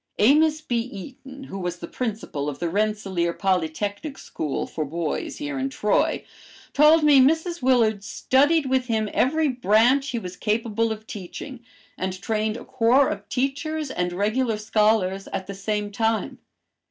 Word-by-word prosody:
Amos 300 Hz, +7 st, +4 dB
B. 240 Hz, -6 st, -1 dB
Eaton, 255 Hz, +5 st, -8 dB
who 195 Hz, -7 st, -7 dB
was 180 Hz, -1 st, -3 dB
the 170 Hz, -, -8 dB
principal 210 Hz, -, -3 dB
of 145 Hz, -, -6 dB
the 170 Hz, -, -2 dB
Rensselaer 195 Hz, -3 st, 0 dB
Polytechnic 195 Hz, -, -2 dB
School 150 Hz, -3 st, -4 dB
for 155 Hz, -, -4 dB
boys 170 Hz, -, -3 dB
here 290 Hz, -2 st, -4 dB
in 270 Hz, +1 st, -1 dB
Troy, 210 Hz, -6 st, 0 dB, 0.5 s
told 305 Hz, +2 st, +6 dB
me 290 Hz, -2 st, +7 dB
Mrs. 320 Hz, +5 st, +2 dB
Willard 230 Hz, -5 st, +3 dB
studied 285 Hz, +9 st, +2 dB
with 260 Hz, -1 st, 0 dB
him 220 Hz, -3 st, 0 dB
every 315 Hz, +4 st, +2 dB
branch 250 Hz, +2 st, +3 dB
he 240 Hz, -, -2 dB
was 185 Hz, -5 st, -6 dB
capable 225 Hz, +2 st, 0 dB
of 220 Hz, 0 st, -6 dB
teaching, 225 Hz, +6 st, -8 dB, 0.4 s
and 185 Hz, 0 st, -3 dB
trained 215 Hz, +1 st, -1 dB
a 240 Hz, -, -10 dB
corps 260 Hz, +2 st, +3 dB
of -, -, -6 dB
teachers 285 Hz, +3 st, -2 dB
and 180 Hz, -5 st, -1 dB
regular 215 Hz, +5 st, 0 dB
scholars 210 Hz, -3 st, +1 dB
at 190 Hz, -1 st, -4 dB
the 200 Hz, -, -6 dB
same 205 Hz, +1 st, -3 dB
time. 225 Hz, +1 st, -1 dB
225 Hz, 155 wpm, -24 LUFS, 195-270 Hz, 0.5 s, me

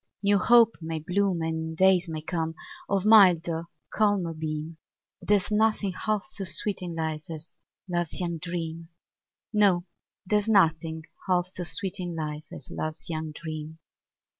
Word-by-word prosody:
New 200 Hz, 0 st, +4 dB
hope 230 Hz, +2 st, +5 dB
may 160 Hz, 0 st, -3 dB
bloom, 180 Hz, +2 st, 0 dB
And 160 Hz, 0 st, -3 dB
days 185 Hz, -1 st, +4 dB
may 155 Hz, -1 st, -5 dB
come, 160 Hz, -1 st, -2 dB, 0.3 s
Of 195 Hz, -1 st, 0 dB
milder, 175 Hz, -6 st, +5 dB, 0.3 s
calmer 205 Hz, -6 st, +1 dB
beam, 155 Hz, 0 st, -5 dB, 0.4 s
But -, -, -14 dB
there's 205 Hz, -1 st, +3 dB
nothing 210 Hz, -2 st, +2 dB
half 215 Hz, +2 st, -1 dB
so 195 Hz, -, -4 dB
sweet 185 Hz, +4 st, +1 dB
in 175 Hz, -2 st, -5 dB
life 160 Hz, -1 st, -3 dB
As 160 Hz, 0 st, -8 dB, 0.3 s
love's 175 Hz, -2 st, -2 dB
young 170 Hz, -2 st, -2 dB
dream; 165 Hz, -1 st, -5 dB, 0.6 s
No, 195 Hz, -4 st, +3 dB, 0.4 s
there's 210 Hz, +2 st, +1 dB
nothing 160 Hz, -6 st, +2 dB, 0.2 s
half 180 Hz, -1 st, +2 dB
so 185 Hz, 0 st, -5 dB
sweet 190 Hz, +2 st, -1 dB
in 175 Hz, -2 st, -4 dB
life 155 Hz, -1 st, -5 dB
As -, -, -9 dB
love's 155 Hz, +2 st, -4 dB
young 155 Hz, -1 st, -3 dB
dream. 155 Hz, 0 st, -7 dB
175 Hz, 150 wpm, -27 LUFS, 160-195 Hz, 0.6 s, hope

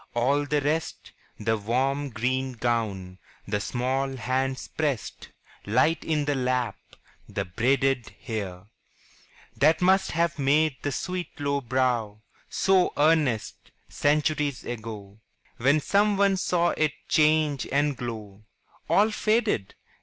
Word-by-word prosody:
All 140 Hz, +5 st, +1 dB
the 150 Hz, 0 st, +1 dB
rest 150 Hz, +3 st, -2 dB, 0.3 s
The 110 Hz, +1 st, +1 dB
warm 135 Hz, +6 st, 0 dB
green 130 Hz, +3 st, -1 dB
gown, 110 Hz, -6 st, -2 dB, 0.3 s
the 105 Hz, 0 st, -1 dB
small 130 Hz, +4 st, -1 dB
hands 130 Hz, +2 st, -2 dB
pressed 145 Hz, -8 st, -3 dB, 0.4 s
Light 130 Hz, +10 st, +2 dB
in 155 Hz, -2 st, 0 dB
the 145 Hz, -, +1 dB
lap, 125 Hz, -5 st, 0 dB, 0.5 s
the -, -, -3 dB
braided 125 Hz, +4 st, +1 dB
hair 100 Hz, -7 st, -5 dB, 0.9 s
That 155 Hz, +3 st, +4 dB
must 190 Hz, +2 st, +3 dB
have 170 Hz, -1 st, 0 dB
made 145 Hz, +1 st, +2 dB
the 145 Hz, -, -2 dB
sweet 180 Hz, +1 st, -4 dB
low 140 Hz, -1 st, 0 dB
brow 120 Hz, -4 st, -1 dB, 0.3 s
So 190 Hz, -2 st, +2 dB
earnest, 150 Hz, -7 st, +1 dB, 0.2 s
centuries 150 Hz, -1 st, 0 dB
ago, 110 Hz, -3 st, -7 dB, 0.4 s
When 140 Hz, +5 st, +3 dB
some 205 Hz, +6 st, +2 dB
one 200 Hz, -1 st, +3 dB
saw 175 Hz, -1 st, +1 dB
it 155 Hz, -3 st, 0 dB
change 155 Hz, -2 st, +2 dB
and 145 Hz, +1 st, +2 dB
glow 110 Hz, -4 st, -7 dB, 0.4 s
All 215 Hz, +2 st, +4 dB
faded! 215 Hz, -, 0 dB
135 Hz, 120 wpm, -26 LUFS, 115-155 Hz, 0.9 s, That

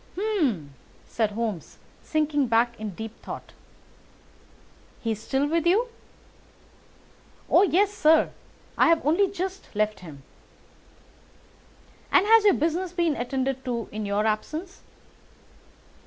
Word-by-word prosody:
"Hum!" 295 Hz, -, -1 dB, 0.3 s
said 220 Hz, -2 st, -1 dB
Holmes, 215 Hz, -6 st, -4 dB, 0.2 s
sinking 300 Hz, -3 st, 0 dB
back 235 Hz, +1 st, +1 dB
in 210 Hz, -4 st, -5 dB
deep 225 Hz, +2 st, -8 dB
thought. -, -, -8 dB, 1.5 s
"He 230 Hz, -, -2 dB
is 215 Hz, -1 st, -4 dB
still 270 Hz, +4 st, 0 dB
with 330 Hz, +2 st, 0 dB
you?" 445 Hz, +8 st, +3 dB, 1.6 s
"Oh, -, -, +5 dB
yes, 400 Hz, +1 st, +3 dB
sir; 315 Hz, -5 st, +4 dB, 0.5 s
I -, -, +6 dB
have 330 Hz, -3 st, +3 dB
only 345 Hz, +6 st, +3 dB
just 380 Hz, 0 st, -5 dB
left 215 Hz, 0 st, 0 dB
him." 150 Hz, -6 st, -12 dB, 1.9 s
"And -, -, +5 dB
has 445 Hz, 0 st, +6 dB
your 405 Hz, -, +6 dB
business 335 Hz, +3 st, -1 dB
been 340 Hz, -4 st, +1 dB
attended 265 Hz, +1 st, -2 dB
to 235 Hz, -3 st, -3 dB
in 215 Hz, 0 st, -4 dB
your 205 Hz, +1 st, 0 dB
absence?" 310 Hz, -, -3 dB
285 Hz, 120 wpm, -25 LUFS, 220-360 Hz, 1.9 s, I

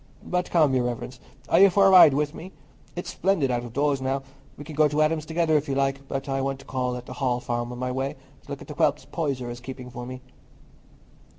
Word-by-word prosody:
But 180 Hz, 0 st, -1 dB
come, 155 Hz, -5 st, +3 dB
Your 125 Hz, -2 st, +2 dB
Reverence, 125 Hz, +1 st, -5 dB, 0.3 s
are -, -, +4 dB
you 200 Hz, +1 st, +8 dB
for 195 Hz, +2 st, +4 dB
a 195 Hz, -, +6 dB
ride 175 Hz, -7 st, +8 dB
with 150 Hz, +1 st, 0 dB
me? 185 Hz, +4 st, -10 dB, 0.4 s
It's 175 Hz, -, -5 dB
splendid 175 Hz, -9 st, +1 dB
out 120 Hz, -1 st, -1 dB
of 120 Hz, -, -8 dB
doors 140 Hz, +1 st, 0 dB
now. 135 Hz, +1 st, -1 dB, 0.3 s
We 145 Hz, -, -8 dB
can 155 Hz, +1 st, -9 dB
go 155 Hz, +1 st, +4 dB
to 150 Hz, +1 st, -2 dB
Adam's 155 Hz, 0 st, 0 dB
together, 160 Hz, -1 st, +1 dB
if 145 Hz, 0 st, -3 dB
you 135 Hz, -, 0 dB
like; 135 Hz, 0 st, -1 dB
but 135 Hz, 0 st, -4 dB
I 135 Hz, 0 st, -1 dB
want 135 Hz, 0 st, -2 dB
to 135 Hz, -, -15 dB
call 125 Hz, -1 st, -2 dB
at 125 Hz, -, -9 dB
the -, -, -8 dB
Hall 125 Hz, -3 st, 0 dB
Farm 120 Hz, 0 st, -3 dB
on 125 Hz, -, -7 dB
my 125 Hz, 0 st, -2 dB
way, 135 Hz, +2 st, -2 dB, 0.3 s
to -, -, -19 dB
look -, -, -6 dB
at -, -, -17 dB
the -, -, -7 dB
whelps -, -, +1 dB
Poyser 135 Hz, -7 st, -3 dB
is 120 Hz, -, -8 dB
keeping 125 Hz, 0 st, -9 dB
for 125 Hz, 0 st, -7 dB
me." 130 Hz, 0 st, -8 dB
135 Hz, 255 wpm, -25 LUFS, 125-155 Hz, 0.4 s, you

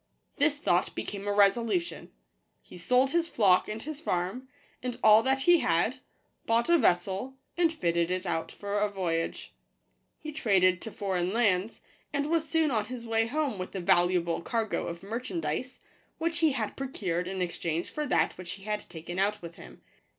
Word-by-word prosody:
This 290 Hz, 0 st, +2 dB
thought 175 Hz, -10 st, +1 dB
became 200 Hz, 0 st, -5 dB
a -, -, +1 dB
resolution: 230 Hz, -, +1 dB, 0.5 s
he -, -, -14 dB
sold 250 Hz, +9 st, +2 dB
his 335 Hz, 0 st, +1 dB
flock 190 Hz, -5 st, +4 dB
and 215 Hz, +1 st, -5 dB
his 310 Hz, 0 st, -6 dB
farm, 190 Hz, -, -2 dB, 0.3 s
and 250 Hz, -1 st, -4 dB
all 215 Hz, 0 st, +8 dB
that 265 Hz, +2 st, +1 dB
he 350 Hz, -1 st, +6 dB
had, 220 Hz, -, +1 dB, 0.5 s
bought 230 Hz, +4 st, +2 dB
a 340 Hz, -, +6 dB
vessel, 195 Hz, +4 st, +1 dB, 0.2 s
and 345 Hz, -2 st, +3 dB
fitted 170 Hz, -, 0 dB
it 185 Hz, +1 st, -2 dB
out 165 Hz, -2 st, -2 dB
for 205 Hz, 0 st, -3 dB
a 210 Hz, 0 st, +1 dB
voyage. 170 Hz, -4 st, -3 dB, 0.6 s
He 305 Hz, -, -7 dB
traded 185 Hz, -, +2 dB
to 225 Hz, -, -6 dB
foreign 185 Hz, -3 st, -1 dB
lands, 210 Hz, -2 st, +1 dB, 0.3 s
and 285 Hz, +2 st, -1 dB
was 325 Hz, -2 st, +1 dB
soon 320 Hz, -3 st, +2 dB
on 215 Hz, -4 st, 0 dB
his 245 Hz, 0 st, -7 dB
way 225 Hz, 0 st, +1 dB
home 285 Hz, -5 st, -1 dB
with 185 Hz, +2 st, -6 dB
a -, -, -1 dB
valuable 175 Hz, -1 st, +2 dB
cargo 225 Hz, +3 st, -2 dB
of 170 Hz, +1 st, -6 dB
merchandise, 200 Hz, -1 st, -4 dB, 0.4 s
which 335 Hz, 0 st, -1 dB
he 320 Hz, -4 st, +3 dB
had -, -, -3 dB
procured 185 Hz, -10 st, -3 dB
in 190 Hz, 0 st, -4 dB
exchange 170 Hz, -2 st, -2 dB
for 300 Hz, -1 st, -3 dB
that -, -, +1 dB
which 180 Hz, -2 st, -5 dB
he 195 Hz, -, -12 dB
had 210 Hz, 0 st, -2 dB
taken 175 Hz, +1 st, -6 dB
out 205 Hz, +2 st, +1 dB
with 170 Hz, 0 st, -7 dB
him. 60 Hz, 0 st, -13 dB
210 Hz, 180 wpm, -29 LUFS, 180-265 Hz, 0.6 s, all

